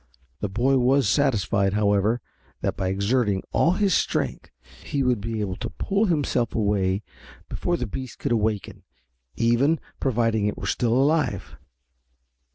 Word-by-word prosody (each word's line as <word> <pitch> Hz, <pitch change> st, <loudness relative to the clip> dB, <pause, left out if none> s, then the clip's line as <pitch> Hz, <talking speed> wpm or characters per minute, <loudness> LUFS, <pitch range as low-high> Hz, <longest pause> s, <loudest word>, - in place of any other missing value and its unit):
The 105 Hz, -, -2 dB
boy 125 Hz, +7 st, +2 dB
was 130 Hz, 0 st, +3 dB
satisfied, 100 Hz, -5 st, +2 dB
however, 105 Hz, +2 st, +2 dB, 0.4 s
that -, -, -1 dB
by 95 Hz, -, -2 dB
exerting 100 Hz, +1 st, +1 dB
all 170 Hz, -, +3 dB
his 195 Hz, -1 st, +1 dB
strength -, -, -1 dB, 0.3 s
he 140 Hz, -1 st, -1 dB
would 125 Hz, -4 st, +1 dB
be 110 Hz, 0 st, -3 dB
able 95 Hz, -3 st, -3 dB
to -, -, -4 dB
pull 200 Hz, +2 st, 0 dB
himself 145 Hz, -, 0 dB
away 100 Hz, -2 st, +1 dB, 0.5 s
before 175 Hz, 0 st, -1 dB
the 125 Hz, -, -3 dB
beast 130 Hz, +3 st, -6 dB
could 140 Hz, -, -3 dB
awaken, 105 Hz, -3 st, -1 dB, 0.5 s
even, 120 Hz, +7 st, +2 dB, 0.2 s
providing 115 Hz, -5 st, +1 dB
it 105 Hz, -, -3 dB
were -, -, -6 dB
still 120 Hz, -2 st, 0 dB
alive. 145 Hz, +4 st, +1 dB
115 Hz, 145 wpm, -24 LUFS, 105-135 Hz, 0.5 s, was